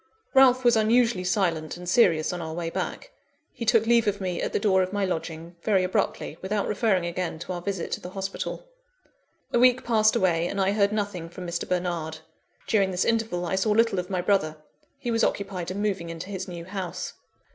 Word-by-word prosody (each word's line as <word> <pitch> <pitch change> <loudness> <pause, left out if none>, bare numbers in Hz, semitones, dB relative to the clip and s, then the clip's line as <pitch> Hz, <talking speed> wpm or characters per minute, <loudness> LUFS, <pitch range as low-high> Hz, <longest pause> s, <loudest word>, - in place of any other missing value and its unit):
Ralph 260 -2 +6
was 240 - +6
unusually 225 -2 +3
silent 175 -5 0
and 180 0 -9
serious 175 -6 +3
on 175 - -4
our 160 -1 -5
way 165 -1 -3
back. - - -4 0.4
He 230 - -5
took 225 -1 +4
leave 235 -1 +4
of 205 0 0
me 185 -2 -2
at - - -2
the - - +1
door 195 -2 +3
of 185 0 -1
my 205 -1 0
lodging, 165 -1 -5
very 195 -2 +2
abruptly; 185 - -1
without 200 +2 -1
referring 200 -4 +1
again 170 -1 -3
to 170 +3 -5
our 175 - -5
visit 190 -2 -3
to - - -2
the 180 - -7
hospital. 195 - -5 0.9
A 240 - +4
week 250 +1 +5
passed 220 -2 +3
away, 175 -5 +2
and 200 - -3
I 195 0 +3
heard 200 -1 +2
nothing 200 -6 -3
from 180 +1 -8
Mr. 170 -1 -4
Bernard. 175 -3 -2 0.5
During 200 -3 +2
this 180 -1 0
interval, 225 -6 0
I 175 - -2
saw 190 +3 +1
little 225 -2 +3
of 180 +1 -5
my 185 -2 -1
brother; 175 -5 +1 0.4
he 250 -4 -3
was 230 0 +1
occupied 185 -3 -1
in 200 +3 -3
moving 190 -5 -1
into 165 +4 -7
his 190 -1 -4
new 170 -2 -7
house. 190 -2 -5
190 Hz, 210 wpm, -26 LUFS, 175-215 Hz, 0.9 s, Ralph